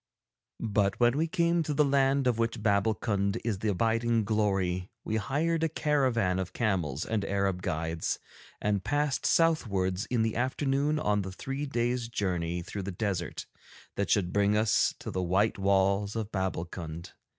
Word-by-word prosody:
But 100 -3 0
when 120 +1 +4
we 160 +3 +1
came 170 0 +2
to 150 -2 -2
the 150 - +4
land 135 0 +2
of 120 -2 +1
which 115 -1 -1
Babbulkund 100 -1 +1
is 110 -4 -1
the 110 - -2
abiding 115 +3 +1
glory, 95 -4 0
we 110 - -1
hired 160 +8 0
a 165 - +2
caravan 130 - +1
of 95 -1 -4
camels 90 - -1
and 110 -3 -1
Arab 100 -2 0
guides, 80 -3 -2 0.4
and 100 -2 0
passed 145 -1 0
southwards 100 - +1
in 120 -3 +1
the 110 -1 -1
afternoon 135 +4 0
on 105 -8 +1
the 95 -1 -5
three 135 +9 -4
days' 120 -2 -1
journey 90 -6 -2
through 100 - -5
the 100 +1 -4
desert 90 -3 -3 0.5
that 100 - -1
should 90 -4 +1
bring 100 +1 +3
us 110 0 +2
to - - -6
the 95 - -2
white 95 +4 +1
walls 100 +1 +2
of 110 -1 -3
Babbulkund. 85 -3 -4
105 Hz, 160 wpm, -29 LUFS, 95-125 Hz, 0.5 s, when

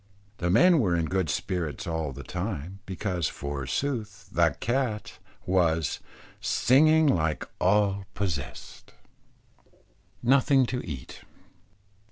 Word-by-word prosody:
The 85 - 0
men 155 - +6
were 95 -8 +2
in 85 -1 +1
good 95 -1 -1
spirits 80 -1 -2
all 80 -3 -2
the 70 +1 -8
time, 90 0 -5
because 90 -4 -2
forsooth, 105 - -4
the - - +2
cat, 120 -3 -2 0.3
was 80 -5 +1 0.4
"singing 155 +5 +4
like 80 - +1
all 100 +1 +2
possessed." 85 -9 -5 1.3
NOTHING 135 +1 +4
TO 125 +1 -3
EAT. 70 -6 -8
95 Hz, 105 wpm, -27 LUFS, 80-120 Hz, 1.3 s, men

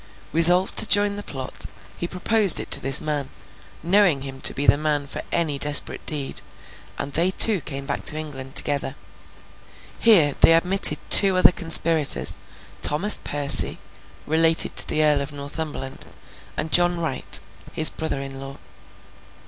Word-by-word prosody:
Resolved 175 +3 +3
to - - +3
join 205 0 0
the 205 - -8
plot, 135 -9 -7 0.3
he 175 - -7
proposed 195 +1 +1
it - - -9
to - - +6
this 135 +2 +3
man, 145 -3 -5 0.5
knowing 175 -6 0
him 135 -1 -10
to - - 0
be 140 - -5
the - - +4
man 150 -1 -3
for 140 - -8
any 155 -5 -3
desperate 145 0 +1
deed, 145 -3 -5 0.6
and 140 - -8
they 170 +3 0
two 200 0 +4
came 140 -1 -8
back 140 0 -6
to 155 - +1
England 135 -3 -10
together. 140 -2 0 1.0
Here, 170 -11 +4
they 165 - +5
admitted 185 +4 +3
two 195 -2 +5
other 185 - +4
conspirators; 165 -3 +1 0.5
Thomas 180 +9 +2
Percy, 145 -1 +1 0.5
related 160 +1 +3
to - - +4
the 155 - -1
Earl 150 -2 0
of 140 +1 -8
Northumberland, 145 -1 -9 0.5
and 160 - -6
John 175 0 +1
Wright, 155 -6 0 0.3
his 155 - +5
brother 155 -3 -6
in 135 -1 -10
law. 135 0 -11
155 Hz, 155 wpm, -20 LUFS, 140-175 Hz, 1.0 s, to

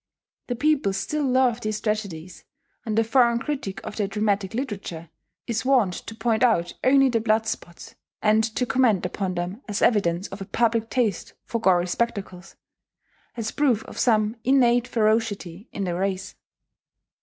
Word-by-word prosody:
The 245 - -2
people 280 -6 +1
still 200 +11 -2
love 255 -3 +2
these 215 -1 -2
tragedies; 200 -6 -4 0.4
and 215 -1 -2
the 225 - +5
foreign 235 +1 +3
critic 250 -7 -4
of - - -7
their 205 -2 0
dramatic 205 -1 -1
literature 195 - -5 0.3
is 230 -2 -2
wont 250 -8 +3
to 225 - -8
point 225 -1 0
out 195 -9 +2
only 270 +1 +5
the 235 -3 +1
blood 220 0 +1
spots, 175 -6 -6 0.3
and 215 +1 +3
to 250 - +1
comment 235 -5 +2
upon 190 -3 -3
them 180 +6 -4
as 205 -2 -2
evidence 195 -5 +2
of 195 +1 -9
a - - -4
public 230 +2 0
taste 230 -8 -1
for 230 - -3
gory 180 -4 +3
spectacles, 195 -2 -3 0.8
as 220 -2 -3
proof 255 -7 +1
of - - -9
some 215 -1 +2
innate 245 -2 +3
ferocity 215 -4 -1
in 200 - -4
the 180 -2 -1
race. 190 +1 -2
220 Hz, 160 wpm, -24 LUFS, 195-240 Hz, 0.8 s, the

